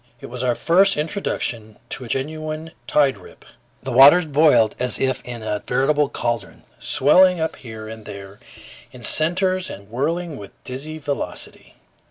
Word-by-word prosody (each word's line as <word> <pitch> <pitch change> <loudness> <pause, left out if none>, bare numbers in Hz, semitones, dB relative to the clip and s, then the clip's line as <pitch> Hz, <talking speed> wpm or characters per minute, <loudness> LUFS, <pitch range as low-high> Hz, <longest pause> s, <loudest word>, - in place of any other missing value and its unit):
It - - -10
was 125 0 -5
our 125 -2 +1
first 195 +6 +3
introduction 125 - -3
to 130 - -5
a - - -9
genuine 155 +4 -4 0.2
tide 135 -7 +2
rip. 90 - -16 0.4
The 130 - -4
waters 140 +8 +7
boiled 145 -7 +4
as 125 0 -1
if 130 -1 -1
in 120 -2 -7
a 105 -1 -2
veritable 145 +1 +2
caldron, 115 -4 -4 0.2
swelling 180 +6 +4
up 160 0 -2
here 110 -3 -9
and 110 -1 -9
there 100 0 -10 0.5
in 125 - -13
centers 185 +5 +1
and 100 +2 -10
whirling 160 +5 -2
with 100 -4 -11
dizzy 140 +5 -6
velocity. 145 -2 -6
135 Hz, 155 wpm, -21 LUFS, 115-155 Hz, 0.5 s, waters